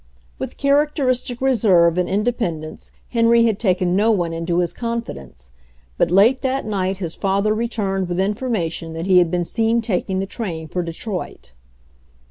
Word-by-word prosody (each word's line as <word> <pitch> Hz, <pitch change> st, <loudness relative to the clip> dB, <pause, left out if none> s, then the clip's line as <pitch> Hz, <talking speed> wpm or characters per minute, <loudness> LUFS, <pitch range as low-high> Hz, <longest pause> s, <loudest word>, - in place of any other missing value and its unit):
With -, -, -6 dB
characteristic 280 Hz, -4 st, +1 dB
reserve 195 Hz, -10 st, +4 dB
and 180 Hz, -1 st, 0 dB
inde 205 Hz, +3 st, 0 dB
pendence 160 Hz, -9 st, -5 dB, 0.2 s
Henry 230 Hz, 0 st, +4 dB
had 220 Hz, -3 st, 0 dB
taken 185 Hz, -4 st, +1 dB
no 210 Hz, +3 st, +3 dB
one 175 Hz, -6 st, +1 dB
into 165 Hz, +1 st, -2 dB
his 175 Hz, -1 st, +1 dB
confi 235 Hz, -1 st, -3 dB
dence, 65 Hz, -2 st, -13 dB, 0.4 s
but -, -, +1 dB
late 210 Hz, +9 st, +4 dB
that 265 Hz, +1 st, -1 dB
night 195 Hz, -3 st, -1 dB
his 170 Hz, -4 st, -4 dB
father 200 Hz, +2 st, 0 dB
returned 205 Hz, -5 st, -2 dB
with 175 Hz, +1 st, -2 dB
information 190 Hz, -6 st, -2 dB
that 165 Hz, +1 st, -4 dB
he 185 Hz, -1 st, +5 dB
had 175 Hz, -2 st, +3 dB
been 175 Hz, 0 st, -1 dB
seen 225 Hz, +4 st, +1 dB
taking 190 Hz, -4 st, -2 dB
the 190 Hz, -, -1 dB
train 175 Hz, -6 st, -5 dB
for 180 Hz, -, -2 dB
Detroit. 175 Hz, -, -6 dB
195 Hz, 165 wpm, -20 LUFS, 175-230 Hz, 0.4 s, he